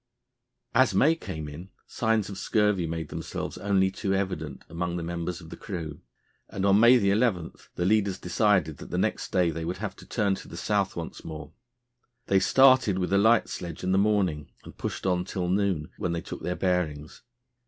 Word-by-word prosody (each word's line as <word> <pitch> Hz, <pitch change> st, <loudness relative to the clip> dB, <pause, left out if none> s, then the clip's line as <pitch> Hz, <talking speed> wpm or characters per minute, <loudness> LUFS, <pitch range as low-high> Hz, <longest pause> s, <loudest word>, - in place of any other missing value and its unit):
As 130 Hz, +3 st, +4 dB
May 155 Hz, +4 st, +5 dB
came 80 Hz, -, -6 dB
in 80 Hz, +6 st, -9 dB, 0.2 s
signs 110 Hz, -3 st, 0 dB
of 100 Hz, -2 st, -7 dB
scurvy 105 Hz, -6 st, +1 dB
made 80 Hz, 0 st, -4 dB
themselves -, -, -5 dB
only 95 Hz, -1 st, +2 dB
too 95 Hz, 0 st, -1 dB
evident 95 Hz, -1 st, -3 dB
among 85 Hz, +1 st, -3 dB
the 85 Hz, -, -4 dB
members 85 Hz, +1 st, -4 dB
of 80 Hz, -1 st, -12 dB
the -, -, -6 dB
crew, 80 Hz, -7 st, -6 dB, 0.5 s
and 95 Hz, -, -2 dB
on 100 Hz, +1 st, +5 dB
May 120 Hz, +3 st, +8 dB
11 100 Hz, -5 st, +1 dB, 0.2 s
the 90 Hz, -, -1 dB
leaders 100 Hz, -1 st, +2 dB
decided 90 Hz, -4 st, +1 dB
that -, -, -10 dB
the -, -, -2 dB
next -, -, -1 dB
day 90 Hz, -2 st, +2 dB
they 80 Hz, +1 st, -5 dB
would 90 Hz, +3 st, -3 dB
have 100 Hz, -1 st, -5 dB
to -, -, -14 dB
turn 105 Hz, -4 st, +1 dB
to -, -, -14 dB
the 85 Hz, -, -9 dB
south 100 Hz, +1 st, 0 dB
once 85 Hz, -1 st, -6 dB
more. 80 Hz, -1 st, -8 dB, 0.7 s
They 95 Hz, -, +3 dB
started 130 Hz, -2 st, +5 dB
with 95 Hz, +1 st, -1 dB
a 100 Hz, -, +5 dB
light 115 Hz, +2 st, +4 dB
sledge 85 Hz, -2 st, -6 dB
in 95 Hz, -, 0 dB
the 95 Hz, -, +3 dB
morning 95 Hz, -8 st, +1 dB
and -, -, -12 dB
pushed -, -, -5 dB
on 90 Hz, -1 st, +1 dB
till 90 Hz, -1 st, -3 dB
noon, 95 Hz, -5 st, 0 dB
when 90 Hz, -, -1 dB
they 85 Hz, -, -2 dB
took -, -, -8 dB
their 90 Hz, -, -2 dB
bearings. 80 Hz, -6 st, -2 dB
95 Hz, 195 wpm, -27 LUFS, 85-100 Hz, 0.7 s, May